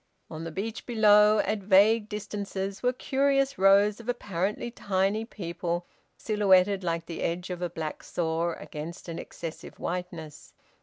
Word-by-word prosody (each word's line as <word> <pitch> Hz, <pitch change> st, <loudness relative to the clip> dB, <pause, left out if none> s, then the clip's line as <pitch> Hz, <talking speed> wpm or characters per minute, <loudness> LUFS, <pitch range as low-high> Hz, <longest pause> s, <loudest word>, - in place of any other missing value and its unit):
On 160 Hz, +1 st, -6 dB
the 165 Hz, -, -5 dB
beach 215 Hz, +7 st, -5 dB
below, 210 Hz, -2 st, +6 dB
at 215 Hz, -, 0 dB
vague 205 Hz, +3 st, +4 dB
distances 200 Hz, -2 st, -4 dB
were 250 Hz, -, +2 dB
curious 275 Hz, +1 st, +1 dB
rows 200 Hz, +2 st, +5 dB
of 235 Hz, +1 st, -8 dB
apparently 210 Hz, -1 st, -2 dB
tiny 200 Hz, 0 st, 0 dB
people 175 Hz, -4 st, -4 dB, 0.3 s
silhouetted 200 Hz, -2 st, +3 dB
like 170 Hz, -1 st, -1 dB
the 165 Hz, -, -6 dB
edge 180 Hz, +2 st, -2 dB
of 180 Hz, -1 st, -5 dB
a 175 Hz, -, -1 dB
black 160 Hz, -2 st, -5 dB
saw 165 Hz, 0 st, -1 dB
against 165 Hz, +4 st, -8 dB
an 165 Hz, -, -5 dB
excessive 165 Hz, -2 st, -8 dB
whiteness. 170 Hz, -4 st, -6 dB
195 Hz, 145 wpm, -28 LUFS, 170-215 Hz, 0.3 s, below